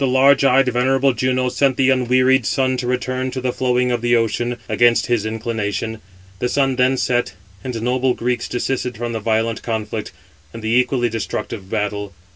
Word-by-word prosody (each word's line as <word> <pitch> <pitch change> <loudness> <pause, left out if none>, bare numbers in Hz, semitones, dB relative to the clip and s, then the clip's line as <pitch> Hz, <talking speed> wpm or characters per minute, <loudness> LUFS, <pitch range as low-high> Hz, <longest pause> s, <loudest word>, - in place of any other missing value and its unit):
But 135 - +2
the 125 - 0
large 140 +2 +5
eyed, 135 0 +4
venerable 130 +2 +2
Juno 130 +1 0
sent 130 +1 +1
the 135 0 +3
unwearied 130 0 +3
sun, 130 -1 +1
to 125 0 -3
return 130 +1 -1
to 130 +1 -4
the 125 -1 -2
flowing 125 -1 +1
of 120 -1 -1
the 120 0 +2
ocean, 120 +1 0
against 120 -1 +3
his 115 -3 0
inclination. 110 -1 -3 0.4
The 125 - -1
sun 135 -1 +1
then 130 +1 +3
set, 120 -4 0 0.3
and 125 -2 -4
the 115 - -4
noble 125 +1 +1
Greeks 120 0 -2
desisted 125 -1 -2
from 120 0 -4
the 110 - -2
violent 110 +1 0
conflict, 110 -1 -4 0.4
and 115 - -8
the 110 - -1
equally 125 0 +2
destructive 105 -3 -5
battle. 105 -2 -3
125 Hz, 190 wpm, -19 LUFS, 115-130 Hz, 0.4 s, large